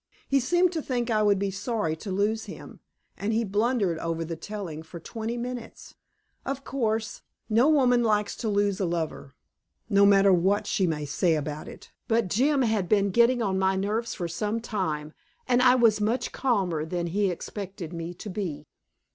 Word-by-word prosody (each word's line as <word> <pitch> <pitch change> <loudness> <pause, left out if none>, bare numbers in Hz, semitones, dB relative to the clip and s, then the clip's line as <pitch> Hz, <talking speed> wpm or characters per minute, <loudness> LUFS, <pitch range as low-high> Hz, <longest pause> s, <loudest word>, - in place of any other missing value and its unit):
He 275 - +3
seemed 350 +7 +2
to 325 -3 -2
think 245 -4 -2
I 215 -1 +2
would 205 -1 +4
be 195 0 -1
sorry 200 -4 -2
to 195 +4 -6
lose 210 +4 0
him, - - -10 0.4
and 205 +2 -2
he 230 +1 +1
blundered 205 -4 0
over 165 0 -2
the 165 +1 -4
telling 180 -4 -6
for 160 +2 -10
twenty 225 +6 -5
minutes. 245 -1 -7 0.5
Of 275 0 -4
course, 225 -5 -2 0.3
no 235 +7 +4
woman 255 -5 +4
likes 210 -3 +1
to 225 - -2
lose 205 -1 +1
a 195 - +1
lover, 160 -5 -3 0.6
no 200 0 +6
matter 195 -1 +6
what 190 +4 +2
she 190 - +1
may 150 -3 -2
say 160 +3 +1
about 150 0 -4
it, - - -12 0.2
but 225 -4 +1
Jim 270 - +2
had 220 -6 0
been 200 -2 +3
getting 235 +3 +4
on 190 -2 0
my 190 0 +2
nerves 215 +5 -1
for 175 - -3
some 210 +6 -2
time, 160 -9 -3 0.3
and 250 -1 +3
I 250 0 +6
was 230 -4 +4
much 225 +5 0
calmer 190 - 0
than 170 +2 -3
he 195 +4 +1
expected 185 -1 -6
me 170 +1 -5
to 205 - -8
be. 170 -7 -4
205 Hz, 185 wpm, -27 LUFS, 175-235 Hz, 0.6 s, no